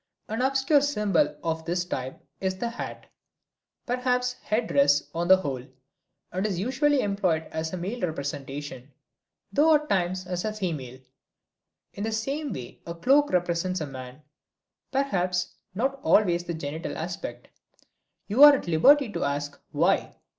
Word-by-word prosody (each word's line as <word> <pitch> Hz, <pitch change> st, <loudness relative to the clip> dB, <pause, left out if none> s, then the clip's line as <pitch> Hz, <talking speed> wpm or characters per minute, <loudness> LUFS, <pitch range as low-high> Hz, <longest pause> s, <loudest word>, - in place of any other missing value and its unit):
An 220 Hz, +3 st, -2 dB
obscure 270 Hz, +2 st, +3 dB
symbol 285 Hz, -1 st, +1 dB
of 160 Hz, -1 st, -2 dB
this 175 Hz, +1 st, -1 dB
type 130 Hz, -6 st, -5 dB, 0.2 s
is 190 Hz, -1 st, -2 dB
the 235 Hz, +5 st, -2 dB
hat, 235 Hz, -, -7 dB, 0.8 s
perhaps 250 Hz, 0 st, 0 dB
headdress 145 Hz, -10 st, +2 dB
on 170 Hz, +1 st, -1 dB
the 190 Hz, +1 st, +8 dB
whole, 135 Hz, -9 st, -4 dB, 0.7 s
and 190 Hz, +3 st, -1 dB
is 195 Hz, -4 st, -2 dB
usually 265 Hz, +6 st, +2 dB
employed 190 Hz, -6 st, 0 dB
as 160 Hz, 0 st, -3 dB
a 185 Hz, -, -4 dB
male 200 Hz, +7 st, -4 dB
representation, 145 Hz, -4 st, -5 dB, 0.6 s
though 310 Hz, +2 st, +5 dB
at 300 Hz, 0 st, -1 dB
times 185 Hz, 0 st, 0 dB
as 180 Hz, -1 st, -3 dB
a 215 Hz, -, -2 dB
female. 155 Hz, -11 st, -4 dB, 1.0 s
In 200 Hz, -, -5 dB
the 225 Hz, -, -1 dB
same 275 Hz, +6 st, -2 dB
way 125 Hz, -2 st, -8 dB
the 170 Hz, -, -6 dB
cloak 275 Hz, +11 st, +3 dB
represents 180 Hz, +1 st, 0 dB
a 155 Hz, -, -2 dB
man, 130 Hz, +1 st, -9 dB, 0.7 s
perhaps 185 Hz, -10 st, 0 dB, 0.2 s
not 265 Hz, +6 st, -1 dB
always 175 Hz, -8 st, +3 dB
the 170 Hz, -, -3 dB
genital 160 Hz, +1 st, -5 dB
aspect. 160 Hz, -8 st, -6 dB, 0.8 s
You 225 Hz, +7 st, +1 dB
are 295 Hz, -1 st, +11 dB
at 260 Hz, -, -5 dB
liberty 270 Hz, -, +5 dB
to -, -, -2 dB
ask, 145 Hz, 0 st, -3 dB
why? -, -, +1 dB
185 Hz, 145 wpm, -26 LUFS, 160-250 Hz, 1.0 s, are